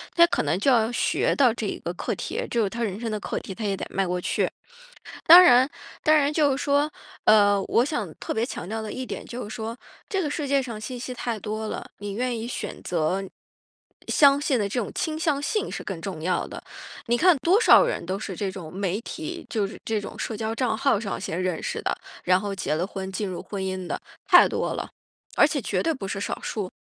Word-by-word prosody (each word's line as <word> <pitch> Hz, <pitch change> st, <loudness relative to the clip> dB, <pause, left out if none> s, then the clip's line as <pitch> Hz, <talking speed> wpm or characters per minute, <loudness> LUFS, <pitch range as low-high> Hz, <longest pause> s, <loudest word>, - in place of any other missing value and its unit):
他 340 Hz, -, +8 dB
可 -, -, 0 dB
能 150 Hz, +3 st, +1 dB
就 270 Hz, +7 st, +3 dB
要 230 Hz, -2 st, +3 dB
学 -, -, +1 dB
到 255 Hz, -5 st, +4 dB
这 225 Hz, -2 st, -3 dB
一 -, -, -3 dB
个 170 Hz, -, -4 dB
课 -, -, -3 dB
题， -, -, -4 dB
就 235 Hz, -2 st, +1 dB
是 200 Hz, -, 0 dB
他 235 Hz, +3 st, -3 dB
人 205 Hz, -2 st, -3 dB
生 230 Hz, -1 st, -3 dB
的 215 Hz, -, -2 dB
课 -, -, -4 dB
题， 190 Hz, -, -8 dB
他 225 Hz, -, -6 dB
也 200 Hz, -1 st, 0 dB
得 -, -, -4 dB
迈 195 Hz, -1 st, 0 dB
过 180 Hz, 0 st, -1 dB
去。 -, -, 0 dB, 0.8 s
当 345 Hz, +3 st, +12 dB
然 260 Hz, -6 st, +6 dB, 0.3 s
当 310 Hz, -, +5 dB
然 290 Hz, 0 st, +2 dB
就 290 Hz, -4 st, +3 dB
是 -, -, -3 dB
说， 285 Hz, +2 st, +2 dB, 0.3 s
呃， 205 Hz, -2 st, +5 dB
我 240 Hz, -, +3 dB
想 240 Hz, -, -3 dB
特 -, -, -4 dB
别 220 Hz, -, 0 dB
强 180 Hz, -, -6 dB
调 220 Hz, +2 st, -3 dB
的 215 Hz, -, -5 dB
一 255 Hz, -, -4 dB
点 -, -, -6 dB
就 245 Hz, -2 st, -6 dB
是 215 Hz, -, -7 dB
说， 225 Hz, +2 st, -5 dB, 0.3 s
这 390 Hz, -2 st, 0 dB
个 305 Hz, -, -1 dB
世 290 Hz, 0 st, -3 dB
界 275 Hz, 0 st, +3 dB
上 230 Hz, -5 st, -6 dB
信 250 Hz, +3 st, -6 dB
息 255 Hz, +1 st, -5 dB
太 235 Hz, -2 st, -3 dB
多 215 Hz, +1 st, -4 dB
了， -, -, -6 dB
你 205 Hz, 0 st, -5 dB
愿 245 Hz, +2 st, -1 dB
意 225 Hz, -, -4 dB
选 245 Hz, -, -5 dB
择 180 Hz, +3 st, 0 dB, 0.8 s
相 280 Hz, -1 st, +5 dB
信 275 Hz, -4 st, +1 dB
的 205 Hz, -, 0 dB
这 245 Hz, -, -1 dB
种 205 Hz, -, -5 dB
倾 310 Hz, -1 st, -2 dB
向 310 Hz, -3 st, +1 dB
性 410 Hz, +8 st, -1 dB
是 -, -, -5 dB
更 185 Hz, -5 st, -5 dB
重 175 Hz, -4 st, -5 dB
要 180 Hz, +2 st, 0 dB
的。 -, -, -8 dB, 0.5 s
你 240 Hz, -, +3 dB
看 355 Hz, +1 st, +5 dB
多 355 Hz, -, +3 dB
少 -, -, +7 dB
人 -, -, -2 dB
都 185 Hz, +2 st, -2 dB
是 195 Hz, -3 st, -5 dB
这 195 Hz, +1 st, -2 dB
种 175 Hz, -4 st, -9 dB
媒 195 Hz, 0 st, -1 dB
体， 330 Hz, +7 st, -6 dB
就 210 Hz, -4 st, 0 dB
是 195 Hz, -, -10 dB
这 220 Hz, -2 st, -1 dB
种 -, -, -8 dB
社 225 Hz, -, -3 dB
交 220 Hz, +1 st, -3 dB
账 235 Hz, -3 st, 0 dB
号 235 Hz, -4 st, +2 dB
上 205 Hz, -4 st, -4 dB
先 180 Hz, -2 st, -3 dB
认 185 Hz, -3 st, -1 dB
识 -, -, -3 dB
的， -, -, 0 dB, 0.3 s
然 180 Hz, 0 st, +4 dB
后 205 Hz, -1 st, -3 dB
结 185 Hz, -, -2 dB
了 170 Hz, +3 st, 0 dB
婚， 190 Hz, 0 st, -6 dB
进 200 Hz, +2 st, -2 dB
入 180 Hz, -, -5 dB
婚 200 Hz, -2 st, -5 dB
姻 185 Hz, -1 st, -3 dB
的， -, -, -3 dB, 0.3 s
太 -, -, +8 dB
多 -, -, -1 dB
了， -, -, -5 dB, 0.5 s
而 -, -, +7 dB
且 -, -, -2 dB
绝 -, -, -1 dB
对 330 Hz, -, +1 dB
不 225 Hz, -9 st, -6 dB
是 195 Hz, -, -3 dB
少 -, -, -3 dB
数。 200 Hz, -4 st, -4 dB
220 Hz, 265 characters per minute, -25 LUFS, 195-275 Hz, 0.8 s, 当